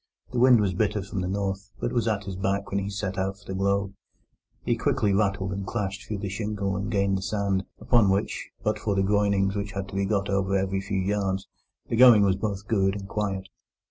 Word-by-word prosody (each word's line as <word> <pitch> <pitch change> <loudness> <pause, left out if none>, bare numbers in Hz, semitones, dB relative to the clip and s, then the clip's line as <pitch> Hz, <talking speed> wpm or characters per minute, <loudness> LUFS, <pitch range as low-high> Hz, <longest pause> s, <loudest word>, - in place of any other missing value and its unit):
The 125 - -1
wind 125 -1 +7
was 100 -3 +1
bitter 105 +1 0
from 100 -1 -4
the 90 - -2
north, 100 +1 -2
but - - -1
was 120 -2 +1
at 105 -2 0
his 95 -1 -5
back 100 +1 -1
when 100 - +1
he 100 0 -3
set 100 -1 -3
out 95 +1 -1
for 100 - -21
the 95 - -5
Globe. 100 +1 0 0.7
He 120 - +2
quickly 115 -3 +1
rattled 100 -1 +1
and 100 +1 -4
clashed 100 -1 -4
through 105 - -3
the 100 0 -4
shingle 100 0 -2
and 100 +2 -3
gained 100 -3 +1
the - - -7
sand, 100 -1 -1
upon 115 -5 +4
which, 95 +1 -1
but 105 0 0
for 105 -2 -1
the 95 - +2
groynings 100 -1 +2
which 100 0 -3
had 100 -1 -4
to 95 - -8
be 100 0 +1
got 100 0 0
over 100 0 +1
every 95 0 -1
few 100 0 -3
yards, 95 0 -1 0.4
the - - -1
going 120 -3 +8
was 95 -2 +3
both 100 -1 -4
good 95 -3 +2
and 100 -1 -6
quiet. 95 -2 -2
100 Hz, 230 wpm, -26 LUFS, 95-105 Hz, 0.7 s, going